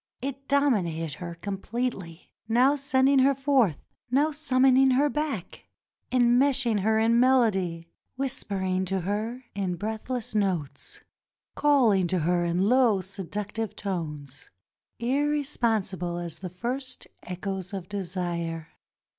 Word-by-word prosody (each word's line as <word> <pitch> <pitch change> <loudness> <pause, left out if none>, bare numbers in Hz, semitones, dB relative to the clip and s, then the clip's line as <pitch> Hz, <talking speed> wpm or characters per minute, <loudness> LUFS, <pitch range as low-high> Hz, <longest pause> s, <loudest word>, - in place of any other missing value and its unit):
It 275 +1 -6
dominated 180 - +1
her 170 -1 -6
completely; 195 -1 -4 0.2
now 255 +5 +4
sending 275 -1 +3
her 270 +1 +4
forth 265 - +2 0.2
— - - -68
now 285 +5 +2
summon 270 -3 +3
ing 265 0 +5
her 290 +2 +3
back 290 - -4 0.2
— - - -51
enmeshing 245 -1 +3
her 220 +3 +2
in 230 +1 +3
melody 195 -10 +2 0.2
— - - -53
whispering 190 -8 -2
to 190 0 -1
her 215 +7 -3
in 190 -3 -2
breathless 220 +5 -4
notes 185 -9 -2 0.3
— - - -61
calhng 240 -11 +3
to 185 - +1
her 175 +2 +1
in 175 +3 +1
low 245 -3 +4
seduc 195 +2 -5
tive 225 -2 -4
tones 150 -8 -5 0.5
irresponsible 235 - 0
as 170 -2 -6
the 185 - -6
first 250 +8 -4 0.2
echoes 185 0 -5
of 190 -3 -6
desire. 170 -4 -4
215 Hz, 130 wpm, -27 LUFS, 180-260 Hz, 0.5 s, ing